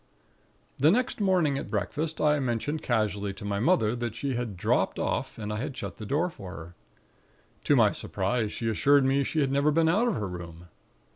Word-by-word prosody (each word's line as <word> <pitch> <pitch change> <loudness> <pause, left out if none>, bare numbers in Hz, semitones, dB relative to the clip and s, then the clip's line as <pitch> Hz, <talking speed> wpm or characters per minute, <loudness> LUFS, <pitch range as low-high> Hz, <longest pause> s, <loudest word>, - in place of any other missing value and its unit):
"The 145 +4 +5
next 235 +3 +1
morning 175 -8 +2
at - - -7
breakfast, 145 - -2
I 150 -1 +3
mentioned 135 +4 -2
casually 105 - -1
to 100 - -9
my 100 -1 -1
mother 120 - +2
that 120 -2 -4
she 135 +3 -2
had 120 -6 -3
'dropped - - +1
off,' - - -2
and 105 -1 -4
I - - -3
had 135 +4 -4
shut 100 -4 -6
the 110 - -7
door 155 +8 +1
for 95 - -9
her. 85 +1 -10 0.9
To - - +4
my - - +5
surprise, 105 +3 -2
she 115 - -4
assured 140 +5 +4
me 135 +1 +2
she 155 +3 -1
had 135 -2 +1
never 140 +2 +3
been 160 +1 +3
out 215 +9 +3
of 230 - 0
her 105 - -2
room. 85 -1 -9
125 Hz, 205 wpm, -27 LUFS, 105-150 Hz, 0.9 s, The